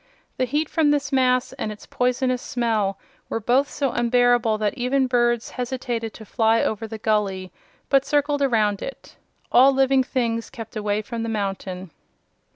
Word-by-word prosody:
The 255 Hz, -, +1 dB
heat 295 Hz, +4 st, -1 dB
from 310 Hz, -1 st, +2 dB
this 290 Hz, -1 st, 0 dB
mass 255 Hz, -1 st, +2 dB
and 255 Hz, -5 st, -4 dB
its 210 Hz, -, -11 dB
poisonous 250 Hz, 0 st, 0 dB
smell 220 Hz, -5 st, -1 dB, 0.3 s
were -, -, -2 dB
both 255 Hz, +6 st, +2 dB
so 275 Hz, -3 st, -1 dB
unbearable 240 Hz, -2 st, +2 dB
that 210 Hz, -1 st, 0 dB
even 260 Hz, +1 st, +1 dB
birds 240 Hz, -2 st, +1 dB
hesitated 245 Hz, -3 st, -3 dB
to 220 Hz, -, -11 dB
fly 225 Hz, +1 st, +2 dB
over 220 Hz, +1 st, -2 dB
the 220 Hz, 0 st, -7 dB
gully, 200 Hz, -4 st, -1 dB, 0.4 s
but 275 Hz, -1 st, +3 dB
circled 290 Hz, 0 st, 0 dB
around 215 Hz, -7 st, +2 dB
it. 270 Hz, -, -8 dB, 0.4 s
All 265 Hz, +3 st, +7 dB
living 270 Hz, 0 st, +3 dB
things 230 Hz, -3 st, -2 dB
kept 225 Hz, 0 st, -9 dB
away 210 Hz, 0 st, -1 dB
from 230 Hz, +1 st, -5 dB
the 230 Hz, -, -3 dB
mountain. 195 Hz, -4 st, -4 dB
240 Hz, 165 wpm, -23 LUFS, 220-260 Hz, 0.4 s, All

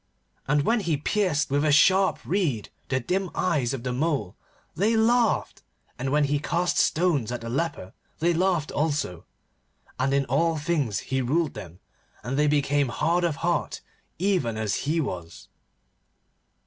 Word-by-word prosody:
And 145 Hz, +1 st, +2 dB
when 230 Hz, +8 st, +2 dB
he 170 Hz, -7 st, 0 dB
pierced 150 Hz, -3 st, 0 dB
with 145 Hz, +1 st, +2 dB
a 155 Hz, -, +3 dB
sharp 190 Hz, +6 st, +4 dB
reed 155 Hz, -, -1 dB, 0.2 s
the 130 Hz, -, +1 dB
dim 185 Hz, +9 st, -1 dB
eyes 145 Hz, -9 st, +1 dB
of 135 Hz, -4 st, -5 dB
the 125 Hz, -1 st, -2 dB
mole, 135 Hz, -, -1 dB, 0.4 s
they 215 Hz, +7 st, +2 dB
laughed, 230 Hz, 0 st, +2 dB, 0.4 s
and 130 Hz, +1 st, -2 dB
when 150 Hz, +2 st, +2 dB
he 145 Hz, 0 st, +1 dB
cast 170 Hz, +4 st, -1 dB
stones 155 Hz, -9 st, +1 dB
at 120 Hz, -, -4 dB
the 115 Hz, -, -6 dB
leper 140 Hz, -, -3 dB, 0.2 s
they 170 Hz, +2 st, +2 dB
laughed 175 Hz, -3 st, +1 dB
also. 145 Hz, -, -2 dB, 0.7 s
And 130 Hz, +1 st, +1 dB
in 140 Hz, 0 st, +2 dB
all 160 Hz, +6 st, +1 dB
things 150 Hz, -, -1 dB
he 130 Hz, -, +2 dB
ruled 150 Hz, +5 st, 0 dB
them, 90 Hz, -4 st, -10 dB, 0.4 s
and 125 Hz, +4 st, -3 dB
they 150 Hz, +1 st, +3 dB
became 145 Hz, -2 st, +2 dB
hard 170 Hz, +7 st, 0 dB
of 170 Hz, -4 st, +1 dB
heart 175 Hz, -3 st, -1 dB, 0.4 s
even 175 Hz, -, 0 dB
as 110 Hz, +4 st, -2 dB
he 165 Hz, +2 st, +1 dB
was. 90 Hz, -, -5 dB
150 Hz, 160 wpm, -25 LUFS, 130-170 Hz, 0.7 s, sharp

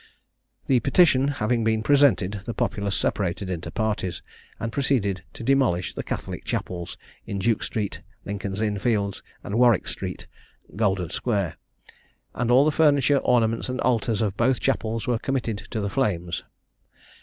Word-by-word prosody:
The 130 Hz, -2 st, +3 dB
petition 135 Hz, +1 st, +4 dB
having 120 Hz, -4 st, 0 dB
been 110 Hz, 0 st, +1 dB
presented, 110 Hz, -8 st, +3 dB
the 115 Hz, -, -4 dB
populace 100 Hz, -1 st, -1 dB
separated 95 Hz, 0 st, -1 dB
into 85 Hz, -2 st, -4 dB
parties, 105 Hz, -7 st, -2 dB, 0.4 s
and 115 Hz, -, -3 dB
proceeded 110 Hz, -9 st, 0 dB
to -, -, -8 dB
demolish 120 Hz, -9 st, +2 dB
the -, -, -4 dB
Catholic -, -, -5 dB
chapels, 85 Hz, -2 st, -4 dB, 0.3 s
in 100 Hz, -, -3 dB
Duke 105 Hz, +3 st, +1 dB
street, 105 Hz, -3 st, -3 dB, 0.2 s
Lincoln's 100 Hz, 0 st, -4 dB
Inn 105 Hz, -2 st, 0 dB
Fields, 100 Hz, -2 st, 0 dB, 0.2 s
and 105 Hz, +4 st, -2 dB
Warwick 120 Hz, -2 st, +4 dB
street, 90 Hz, -2 st, -5 dB, 0.5 s
Golden 95 Hz, -5 st, 0 dB
square; 100 Hz, -8 st, -1 dB, 0.8 s
and 120 Hz, -1 st, -1 dB
all 130 Hz, +4 st, +6 dB
the 155 Hz, -, +3 dB
furniture, 145 Hz, -3 st, +4 dB
ornaments, 115 Hz, -1 st, +1 dB
and 130 Hz, 0 st, -3 dB
altars 115 Hz, -3 st, +1 dB
of 100 Hz, -3 st, -1 dB
both 120 Hz, +3 st, +2 dB
chapels 115 Hz, -4 st, -1 dB
were 120 Hz, -2 st, 0 dB
committed 120 Hz, -6 st, -2 dB
to 110 Hz, -, -3 dB
the 100 Hz, -, -1 dB
flames. 90 Hz, -10 st, -1 dB
110 Hz, 150 wpm, -25 LUFS, 100-125 Hz, 0.8 s, all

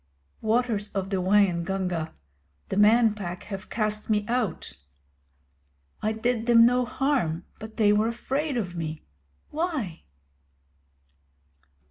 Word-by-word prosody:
Waters 220 Hz, -2 st, +1 dB
of 195 Hz, -1 st, -3 dB
the 195 Hz, -, +1 dB
Waingunga, 180 Hz, -3 st, +1 dB, 0.6 s
the -, -, -2 dB
Man 220 Hz, +2 st, +5 dB
Pack 180 Hz, -4 st, -6 dB
have 195 Hz, -1 st, -7 dB
cast 215 Hz, -1 st, -2 dB
me 210 Hz, -1 st, +2 dB
out. 220 Hz, -, -2 dB, 1.2 s
I 215 Hz, -, +1 dB
did 225 Hz, +1 st, -1 dB
them 230 Hz, -1 st, +7 dB
no 250 Hz, +1 st, +3 dB
harm, 245 Hz, -, 0 dB
but 220 Hz, 0 st, -9 dB
they 210 Hz, -2 st, +5 dB
were 210 Hz, +2 st, +3 dB
afraid 270 Hz, +4 st, -2 dB
of 180 Hz, -6 st, -3 dB
me. 155 Hz, -2 st, -4 dB, 0.5 s
Why? 300 Hz, -, -2 dB
215 Hz, 115 wpm, -26 LUFS, 190-235 Hz, 1.2 s, them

